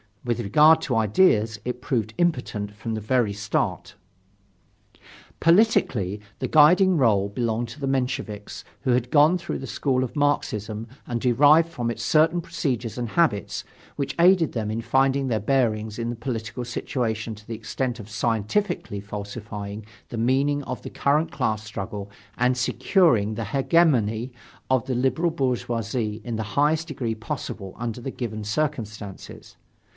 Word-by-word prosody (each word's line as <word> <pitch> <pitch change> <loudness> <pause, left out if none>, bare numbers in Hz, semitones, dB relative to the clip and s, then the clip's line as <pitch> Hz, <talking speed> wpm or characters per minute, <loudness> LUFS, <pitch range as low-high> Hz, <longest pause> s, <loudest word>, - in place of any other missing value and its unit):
With 120 -1 -1
regard 150 +9 +5
to 130 - -1
ideas, 110 - +3
it 125 0 -4
proved 110 -4 -1
impotent 125 -11 -1
from 115 +2 -5
the 110 - -3
very 110 -1 +1
start. 105 0 -2 1.4
Politically, 145 - +3 0.2
the 130 - -1
guiding 175 +5 +6
role 105 -7 +3
belonged 115 +2 -2
to 120 - -10
the 140 - -2
Mensheviks 125 -6 -3 0.2
who 130 - 0
had 125 0 +1
gone 155 +4 +5
through 170 -1 -5
the 135 - -7
school 130 +1 0
of 125 - -5
Marxism 110 -7 -1 0.2
and 120 -1 -2
derived 145 +6 +5
from 120 -7 -3
it 115 - -4
certain 160 +7 +3
procedures 130 -9 -3
and 120 -2 -3
habits, 130 -9 +1 0.3
which 140 -2 -3
aided 175 -2 +5
them 110 -3 -2
in 110 +2 -2
finding 135 +2 +2
their 115 -4 0
bearings 110 -3 0
in 115 0 -2
the 120 - -3
political 115 -1 -4
situation 115 -2 -2
to 105 0 -16
the 115 - -4
extent 120 +2 -3
of 105 0 -9
scientifically 110 - -1
falsifying 105 0 -7 0.2
the 120 - -5
meaning 135 +5 +1
of 125 - -5
the - - -6
current 150 +3 +1
class 110 -6 -1
struggle 100 -1 -6 0.3
and 125 +1 +2
securing 125 - +2
the 115 - -3
hegemony 130 - +2 0.4
of 130 -3 +2
the 130 - -2
liberal 130 +7 +1
bourgeoisie 115 -5 -2
in 120 -2 -4
the 110 - -2
highest 155 +3 +2
degree 125 -7 -3
possible 110 -5 -6
under 120 0 -4
the 135 - -4
given 110 -4 -5
circumstances. 105 -5 -4
120 Hz, 150 wpm, -24 LUFS, 110-140 Hz, 1.4 s, guiding